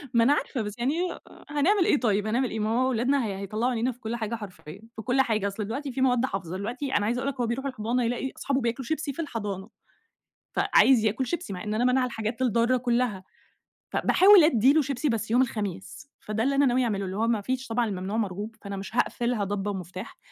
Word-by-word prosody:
ما 230 Hz, -, +6 dB
أنا 270 Hz, +5 st, +5 dB
عارفة 275 Hz, -3 st, -2 dB
بس 210 Hz, -1 st, -4 dB
يعني 255 Hz, +4 st, +1 dB, 0.2 s
أ -, -, -8 dB, 0.3 s
هنعمل 345 Hz, +6 st, +2 dB
إيه 290 Hz, -, +3 dB
طيب، 210 Hz, -3 st, +1 dB
هنعمل 245 Hz, +3 st, +1 dB
إيه؟ 220 Hz, -, -3 dB
ما 215 Hz, 0 st, 0 dB
هو 250 Hz, +3 st, +2 dB
أولادنا 260 Hz, +2 st, +1 dB
هي 200 Hz, -3 st, -3 dB
هيطلّعوا 215 Hz, +6 st, -1 dB
عينينا 240 Hz, +2 st, 0 dB
في 245 Hz, -, -15 dB
كل 230 Hz, 0 st, -4 dB
حاجة 230 Hz, 0 st, -3 dB
حرفيًا 195 Hz, -4 st, -10 dB
في 220 Hz, -, -6 dB
كل 255 Hz, +4 st, +2 dB
حاجة. 215 Hz, -5 st, 0 dB
أصل 200 Hz, +1 st, -4 dB
دلوقتي 270 Hz, +6 st, -4 dB
في 260 Hz, -, -3 dB
مواد 250 Hz, -1 st, +3 dB
حافظة، 185 Hz, -6 st, -4 dB
دلوقتي 245 Hz, +7 st, -4 dB
أنا 205 Hz, -, 0 dB
عايزة 240 Hz, +3 st, 0 dB
أقول 275 Hz, -, -1 dB
لك 270 Hz, -2 st, -7 dB
هو 240 Hz, -, 0 dB
بيروح 245 Hz, +4 st, -3 dB
الحضانة 245 Hz, -1 st, -1 dB
يلاقي 245 Hz, +3 st, -2 dB
أصحابه 275 Hz, -1 st, -1 dB
بياكلوا 235 Hz, +2 st, -2 dB
شيبسي 310 Hz, -1 st, -2 dB
في 335 Hz, -, -4 dB
الحضانة. 205 Hz, -, -5 dB, 0.9 s
فعايز 250 Hz, -5 st, +5 dB
ياكل 220 Hz, +5 st, 0 dB
شيبسي 330 Hz, -, -4 dB
مع 180 Hz, -, -6 dB
إن 210 Hz, 0 st, -3 dB
أنا 225 Hz, -, +1 dB
مانعة 255 Hz, 0 st, +3 dB
الحاجات 230 Hz, 0 st, -4 dB
الضارة 240 Hz, +1 st, +2 dB
كُلّها. 240 Hz, -5 st, 0 dB, 0.7 s
فباحاول 390 Hz, -1 st, +6 dB
أدّي 265 Hz, -3 st, +5 dB
له 315 Hz, -, +4 dB
شيبسي 275 Hz, +1 st, -1 dB
بس 220 Hz, -1 st, -2 dB
يوم 245 Hz, -, +5 dB
الخميس، 210 Hz, +1 st, -4 dB
فده 215 Hz, +1 st, -2 dB
اللي 275 Hz, +2 st, +1 dB
أنا 280 Hz, 0 st, +4 dB
ناوية 255 Hz, 0 st, +2 dB
أعمله، 200 Hz, -4 st, -1 dB
اللي 190 Hz, +1 st, -5 dB
هو 225 Hz, +2 st, +1 dB
ما 230 Hz, -3 st, +1 dB
فيش 260 Hz, +4 st, -3 dB
طبعًا 235 Hz, +1 st, +1 dB
الممنوع 195 Hz, 0 st, -3 dB
مرغوب، 210 Hz, +1 st, -3 dB
فأنا 200 Hz, -1 st, -6 dB
مش 195 Hz, +4 st, -7 dB
هاقفلها 240 Hz, -2 st, 0 dB
ضبّة 205 Hz, +1 st, -2 dB
ومفتاح. 185 Hz, +1 st, -7 dB
235 Hz, 225 wpm, -26 LUFS, 210-260 Hz, 0.9 s, ما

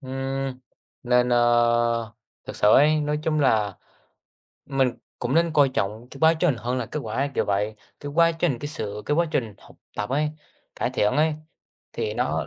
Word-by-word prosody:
ừm, 135 Hz, -1 st, -4 dB, 0.4 s
nên, 125 Hz, 0 st, +2 dB
ơ, 120 Hz, -1 st, +2 dB, 0.3 s
thực -, -, -7 dB
sự 105 Hz, -, +3 dB
ấy, 155 Hz, +2 st, +5 dB
nói 150 Hz, 0 st, -1 dB
chung 155 Hz, -1 st, 0 dB
là 105 Hz, -8 st, +2 dB, 0.9 s
mình 135 Hz, -2 st, +1 dB, 0.3 s
cũng 125 Hz, +2 st, -2 dB
nên 165 Hz, -1 st, +2 dB
coi 145 Hz, -2 st, +5 dB
trọng 110 Hz, -1 st, -3 dB
cái 135 Hz, -, -10 dB
quá 160 Hz, +1 st, +6 dB
trình 160 Hz, -3 st, +1 dB
hơn 120 Hz, +4 st, -2 dB
là 125 Hz, -, -2 dB
kết 150 Hz, -, -5 dB
quả 110 Hz, 0 st, -5 dB
ấy, 140 Hz, +2 st, 0 dB
kiểu -, -, +1 dB
vậy. 105 Hz, +2 st, -1 dB, 0.2 s
Cái 145 Hz, -, -6 dB
quá 165 Hz, 0 st, +5 dB
trình, 165 Hz, -6 st, -1 dB
cái 145 Hz, -, -5 dB
sự 105 Hz, -7 st, -5 dB
cái 150 Hz, -, +1 dB
quá 170 Hz, +2 st, +3 dB
trình 115 Hz, -8 st, -1 dB
học -, -, -18 dB, 0.2 s
tập 105 Hz, +1 st, -3 dB
ấy, 150 Hz, +3 st, +1 dB, 0.5 s
cải -, -, -1 dB
thiện 105 Hz, -, +1 dB
ấy, 155 Hz, +1 st, +3 dB, 0.6 s
thì 450 Hz, 0 st, -3 dB
nó, -, -, -1 dB
130 Hz, 195 wpm, -24 LUFS, 115-150 Hz, 0.9 s, quá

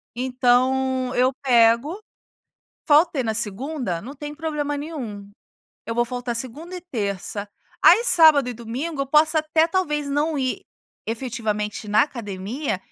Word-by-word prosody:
Então 255 Hz, +1 st, +1 dB
eu 255 Hz, +2 st, +3 dB
pego, 245 Hz, -, +3 dB, 0.9 s
faltei 300 Hz, -1 st, +4 dB
na 220 Hz, -2 st, -2 dB
segunda, 225 Hz, -, -2 dB
não 270 Hz, +5 st, -9 dB
tem 295 Hz, +1 st, -7 dB
problema 300 Hz, -2 st, -3 dB
nenhum. 245 Hz, -10 st, -7 dB, 0.6 s
Eu 230 Hz, -, -3 dB
vou 240 Hz, +1 st, +2 dB
faltar 245 Hz, 0 st, -4 dB
segunda 295 Hz, +10 st, -6 dB
e -, -, -7 dB
terça. 205 Hz, -, -4 dB, 0.4 s
Aí 465 Hz, -, +7 dB
sábado 315 Hz, -, +6 dB
e -, -, -3 dB
domingo 255 Hz, +7 st, -5 dB
eu -, -, -5 dB
posso 305 Hz, +3 st, +3 dB
até 315 Hz, +1 st, +2 dB
talvez 300 Hz, -5 st, -1 dB
não 295 Hz, +2 st, 0 dB
ir 260 Hz, -1 st, -2 dB, 0.4 s
efetivamente 220 Hz, -3 st, -3 dB
na 210 Hz, +2 st, +4 dB
academia, 215 Hz, -1 st, -4 dB
260 Hz, 135 wpm, -23 LUFS, 230-300 Hz, 0.9 s, Aí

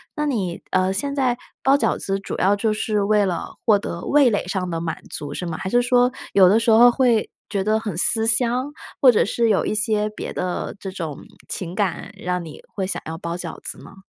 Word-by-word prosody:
那 300 Hz, 0 st, -1 dB
你， 190 Hz, -10 st, -2 dB
呃， 185 Hz, +1 st, +1 dB
现 280 Hz, +8 st, -2 dB
在 255 Hz, -3 st, +1 dB, 0.3 s
包 270 Hz, +1 st, +5 dB
饺 285 Hz, -, +1 dB
子， 195 Hz, 0 st, -2 dB
主 -, -, -6 dB
要 200 Hz, +2 st, +3 dB
就 215 Hz, +1 st, 0 dB
是 210 Hz, 0 st, -1 dB
为 205 Hz, 0 st, +2 dB
了 175 Hz, -3 st, -4 dB
获 210 Hz, -3 st, +4 dB
得 170 Hz, -3 st, -6 dB
味 285 Hz, -3 st, +4 dB
蕾 205 Hz, -5 st, -1 dB
上 180 Hz, -1 st, -3 dB
的 165 Hz, -, -3 dB
满 165 Hz, -1 st, -4 dB
足， 145 Hz, -1 st, -3 dB
是 180 Hz, -, -4 dB
吗？ 160 Hz, -, -4 dB
还 -, -, -5 dB
是 245 Hz, +5 st, +3 dB
说 245 Hz, 0 st, +3 dB, 0.2 s
有 190 Hz, -2 st, +7 dB
的 210 Hz, +4 st, +4 dB
时 230 Hz, 0 st, 0 dB
候 240 Hz, +2 st, +7 dB
会 240 Hz, -4 st, +2 dB, 0.2 s
觉 195 Hz, -2 st, -1 dB
得 215 Hz, +1 st, +1 dB
很 205 Hz, -7 st, -5 dB
思 225 Hz, +4 st, +4 dB
乡， 245 Hz, +4 st, +3 dB, 0.3 s
或 260 Hz, -3 st, +8 dB
者 215 Hz, -, +2 dB
是 230 Hz, +2 st, 0 dB
有 200 Hz, -, +2 dB
一 -, -, -1 dB
些 215 Hz, -1 st, +1 dB
别 210 Hz, -, -7 dB
的 180 Hz, -1 st, -4 dB
这 190 Hz, -2 st, -6 dB
种 165 Hz, -6 st, -6 dB, 0.2 s
情 175 Hz, -2 st, -4 dB
感， 195 Hz, 0 st, -2 dB
让 180 Hz, -2 st, -3 dB
你 155 Hz, -, -11 dB
会 190 Hz, -2 st, -4 dB
想 190 Hz, -, -2 dB
要 160 Hz, 0 st, -5 dB
包 170 Hz, 0 st, -5 dB
饺 175 Hz, -2 st, -6 dB
子 -, -, -5 dB
吗？ 195 Hz, 0 st, -15 dB
205 Hz, 245 characters per minute, -21 LUFS, 180-235 Hz, 0.3 s, 或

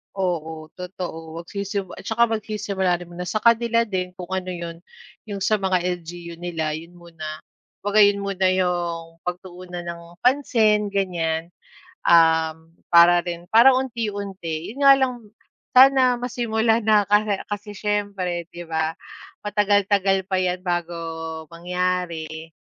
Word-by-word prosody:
Oo, 160 Hz, -4 st, -3 dB
totoo, 175 Hz, -3 st, -7 dB
magsisim 200 Hz, +1 st, -4 dB
at -, -, -10 dB
tsaka 235 Hz, +1 st, +3 dB
magsisimula 205 Hz, -5 st, -1 dB
rin 175 Hz, -, -10 dB
muna 180 Hz, +1 st, -6 dB
sa 215 Hz, -, -2 dB
kanila 235 Hz, 0 st, +4 dB
din 185 Hz, -4 st, -4 dB
kung 180 Hz, -1 st, -8 dB
ano 185 Hz, -1 st, -2 dB
'yon, 170 Hz, -1 st, -6 dB, 0.5 s
'yong 200 Hz, -2 st, -4 dB
sa 215 Hz, +1 st, +2 dB
mga 185 Hz, -2 st, +1 dB, 0.2 s
LGU 170 Hz, 0 st, -9 dB
nila, 165 Hz, -3 st, -2 dB
yun 165 Hz, +3 st, -7 dB
muna. 160 Hz, -3 st, -9 dB, 0.4 s
Kumbaga 205 Hz, +1 st, +2 dB
yun 200 Hz, 0 st, +1 dB
muna 190 Hz, -1 st, 0 dB
'yong 175 Hz, -3 st, -1 dB
pagtuunan 180 Hz, 0 st, -6 dB
ng 170 Hz, 0 st, -6 dB, 0.2 s
pansin 225 Hz, -6 st, +3 dB
ganiyan, 170 Hz, -4 st, -1 dB, 0.6 s
um, 160 Hz, -1 st, +4 dB, 0.2 s
para 175 Hz, +1 st, +7 dB
rin 175 Hz, 0 st, -5 dB
para 235 Hz, +4 st, +7 dB
unti-unti. 200 Hz, -9 st, -3 dB
Yun 270 Hz, -, -13 dB
nga 275 Hz, -, +11 dB
lang 265 Hz, -2 st, +1 dB, 0.6 s
sana 255 Hz, -1 st, +6 dB
masimulan 230 Hz, -2 st, 0 dB
na, 210 Hz, -2 st, +4 dB
kasi 210 Hz, 0 st, +3 dB, 0.2 s
kasi 210 Hz, 0 st, -5 dB
siyempre 195 Hz, -5 st, -2 dB
'di 175 Hz, 0 st, -8 dB
ba, 160 Hz, 0 st, -1 dB, 0.5 s
matagal-tagal 200 Hz, -2 st, +2 dB
pa 190 Hz, -, 0 dB
'yan 180 Hz, 0 st, -1 dB
bago 175 Hz, -1 st, -1 dB, 0.6 s
mangyari, 170 Hz, -2 st, -3 dB
185 Hz, 130 wpm, -23 LUFS, 170-210 Hz, 0.6 s, nga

